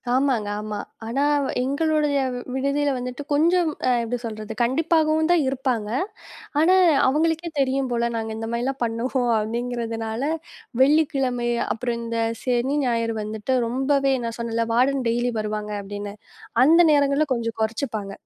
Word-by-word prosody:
ஆமாங்க, 260 Hz, -6 st, +1 dB
ஆமா. 210 Hz, 0 st, -4 dB, 0.3 s
ஆனா 250 Hz, +5 st, 0 dB, 0.4 s
எங்களுடைய 295 Hz, +2 st, +1 dB, 0.2 s
வி -, -, -4 dB
விடுதியில 280 Hz, +2 st, 0 dB
வந்துட்டு 250 Hz, +3 st, -5 dB
கொஞ்சம் 335 Hz, +3 st, +3 dB, 0.2 s
அ -, -, +4 dB
எப்படி 240 Hz, +2 st, -2 dB
சொல்றது, 215 Hz, -1 st, -6 dB
கண்டிப்பாகவும் 315 Hz, +4 st, +2 dB
தான் 345 Hz, -4 st, +4 dB
இருப்பாங்க. 255 Hz, -5 st, -1 dB, 0.7 s
ஆனா 345 Hz, +4 st, +5 dB, 0.3 s
அவங்களுக்கே 325 Hz, +4 st, +1 dB
தெரியும் 270 Hz, -1 st, +1 dB
போல. 235 Hz, 0 st, +1 dB
நாங்க 225 Hz, -1 st, -3 dB
இந்த 225 Hz, -, -4 dB
மாதிரிலாம் 250 Hz, +3 st, -2 dB
பண்ணுவோம் 240 Hz, +2 st, -1 dB
அப்படிங்கிறதுனால 230 Hz, 0 st, -3 dB, 0.6 s
வெள்ளிக்கிழமை, 270 Hz, -4 st, +2 dB, 0.2 s
அப்புறம் 235 Hz, +1 st, -2 dB
இந்தச் 230 Hz, 0 st, -2 dB
சனி, 250 Hz, +2 st, 0 dB
ஞாயிறு 230 Hz, -2 st, 0 dB
வந்துட்டு 215 Hz, +3 st, -4 dB, 0.2 s
ரொம்பவே 270 Hz, +2 st, +1 dB
நான் 230 Hz, 0 st, -4 dB
சொன்னேன்ல 230 Hz, 0 st, -1 dB
வார்டன் 260 Hz, +2 st, +2 dB
டெய்லி 240 Hz, +1 st, 0 dB
வருவாங்க 210 Hz, 0 st, -3 dB
அப்படின்னு. 205 Hz, 0 st, -6 dB, 0.5 s
அந்த 325 Hz, +5 st, +6 dB
நேரங்கள்ல 285 Hz, +1 st, +3 dB
கொஞ்சம் 230 Hz, -2 st, -4 dB
குறைச்சுப்பாங்க. 220 Hz, -3 st, -3 dB
245 Hz, 130 wpm, -23 LUFS, 230-280 Hz, 0.7 s, அந்த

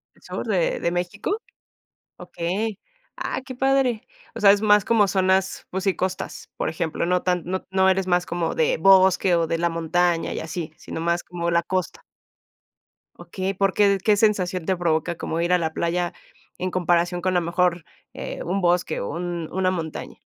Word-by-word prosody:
¿El -, -, -26 dB
sur -, -, -5 dB
de -, -, 0 dB
de -, -, 0 dB
México? 180 Hz, -, -2 dB, 0.8 s
Okey. 200 Hz, +5 st, -3 dB, 0.4 s
Ah, -, -, -3 dB
qué 265 Hz, -, -7 dB
padre. 265 Hz, -3 st, +1 dB, 0.3 s
O -, -, -5 dB
sea, 200 Hz, -1 st, +7 dB
es 200 Hz, 0 st, +2 dB
más 210 Hz, -2 st, +4 dB
como 220 Hz, -3 st, +4 dB
zonas, 190 Hz, 0 st, +1 dB
pues 190 Hz, +1 st, -3 dB
sí, 195 Hz, -2 st, +1 dB
costas, 185 Hz, 0 st, -4 dB
por -, -, -1 dB
ejemplo. 165 Hz, -2 st, -2 dB
No 180 Hz, +1 st, +1 dB
tan 180 Hz, -2 st, 0 dB
no 185 Hz, +2 st, -3 dB
no 190 Hz, 0 st, +4 dB
eres 190 Hz, 0 st, +1 dB
más 180 Hz, -1 st, +2 dB
como 170 Hz, -1 st, -2 dB
de -, -, +2 dB
bosque, 190 Hz, -1 st, +5 dB
o 165 Hz, -1 st, +1 dB
de 165 Hz, -, 0 dB
la 170 Hz, +1 st, +1 dB
montaña 165 Hz, +1 st, 0 dB
y -, -, -3 dB
así, 160 Hz, -1 st, -5 dB
sino -, -, -7 dB
más 170 Hz, +1 st, 0 dB
como 170 Hz, -1 st, -3 dB
la 170 Hz, 0 st, +2 dB
costa. 185 Hz, +1 st, -3 dB, 1.2 s
Okey, 190 Hz, 0 st, -4 dB
¿porque, 195 Hz, +1 st, +2 dB
qué 210 Hz, 0 st, +4 dB
sensación 190 Hz, -5 st, +1 dB
te 190 Hz, -, +1 dB
provoca 170 Hz, -1 st, 0 dB
como 165 Hz, 0 st, -3 dB
ir 175 Hz, +1 st, +1 dB
a 180 Hz, -, +5 dB
la 160 Hz, -2 st, -2 dB
playa 175 Hz, +1 st, -1 dB, 0.4 s
en 185 Hz, +1 st, -3 dB
comparación 175 Hz, 0 st, +1 dB
con 185 Hz, 0 st, 0 dB
a -, -, +4 dB
mejor, 175 Hz, 0 st, 0 dB, 0.3 s
eh, -, -, -6 dB
un 190 Hz, +3 st, -1 dB
bosque 175 Hz, +1 st, +1 dB
o 100 Hz, -, -4 dB
un 170 Hz, -2 st, -4 dB
una 185 Hz, 0 st, +1 dB
montaña? 165 Hz, -4 st, -5 dB
180 Hz, 185 wpm, -23 LUFS, 170-195 Hz, 1.2 s, sea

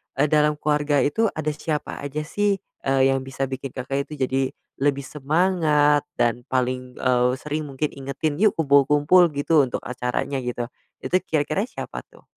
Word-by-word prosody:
eee, 145 Hz, +3 st, +2 dB
dalam 150 Hz, 0 st, +4 dB
keluarga 150 Hz, -1 st, +1 dB
itu 225 Hz, +10 st, +2 dB
ada 155 Hz, -1 st, -1 dB
siapa 150 Hz, 0 st, -4 dB
aja 145 Hz, +2 st, -4 dB
sih, 205 Hz, +5 st, +1 dB, 0.3 s
eee, 135 Hz, 0 st, +4 dB
yang 135 Hz, -, +1 dB
bisa 135 Hz, 0 st, -3 dB
bikin 130 Hz, 0 st, -6 dB
Kakak 135 Hz, +2 st, -3 dB
itu 155 Hz, -, -9 dB
jadi, 135 Hz, +1 st, +1 dB, 0.4 s
lebih 140 Hz, -1 st, +1 dB
semangat 150 Hz, -1 st, +2 dB, 0.2 s
dan 120 Hz, 0 st, +1 dB
paling, 125 Hz, 0 st, -2 dB
eee, 125 Hz, -1 st, +2 dB
sering 150 Hz, +1 st, -4 dB
mungkin 140 Hz, +2 st, -2 dB
ingetin, 140 Hz, +3 st, -3 dB
"Yuk 215 Hz, -5 st, +4 dB
kumpul-kumpul," 145 Hz, +4 st, +5 dB
gitu, 145 Hz, +2 st, +3 dB
untuk -, -, -4 dB
acaranya 125 Hz, +2 st, -2 dB
gitu, 125 Hz, -1 st, -3 dB, 0.4 s
itu 180 Hz, -, 0 dB
kira-kira 155 Hz, +5 st, 0 dB
siapa -, -, -6 dB
tuh? -, -, -21 dB
145 Hz, 160 wpm, -23 LUFS, 130-150 Hz, 0.4 s, kumpul-kumpul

